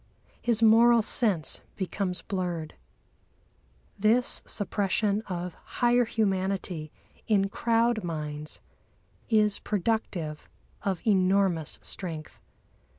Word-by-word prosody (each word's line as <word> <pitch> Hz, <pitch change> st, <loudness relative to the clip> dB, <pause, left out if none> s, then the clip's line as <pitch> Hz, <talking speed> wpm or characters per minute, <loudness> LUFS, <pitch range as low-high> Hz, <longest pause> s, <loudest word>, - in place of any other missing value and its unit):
His 230 Hz, -1 st, +1 dB
moral 230 Hz, +1 st, +6 dB
sense 200 Hz, -8 st, 0 dB
becomes 190 Hz, -1 st, -2 dB
blurred. 175 Hz, -5 st, -3 dB, 1.3 s
This 225 Hz, +4 st, +3 dB
suppression 205 Hz, 0 st, 0 dB
of 180 Hz, -2 st, -4 dB, 0.2 s
higher 245 Hz, 0 st, +4 dB
humanity 190 Hz, -7 st, -1 dB, 0.4 s
in 200 Hz, -3 st, +3 dB
crowd 230 Hz, +1 st, +1 dB
minds 150 Hz, -2 st, -4 dB, 0.7 s
is 210 Hz, -3 st, +3 dB
productive 185 Hz, -7 st, -2 dB, 0.3 s
of 190 Hz, -3 st, -2 dB
enormous 190 Hz, -5 st, +2 dB
strength. 160 Hz, -5 st, -5 dB
195 Hz, 85 wpm, -28 LUFS, 175-220 Hz, 1.3 s, moral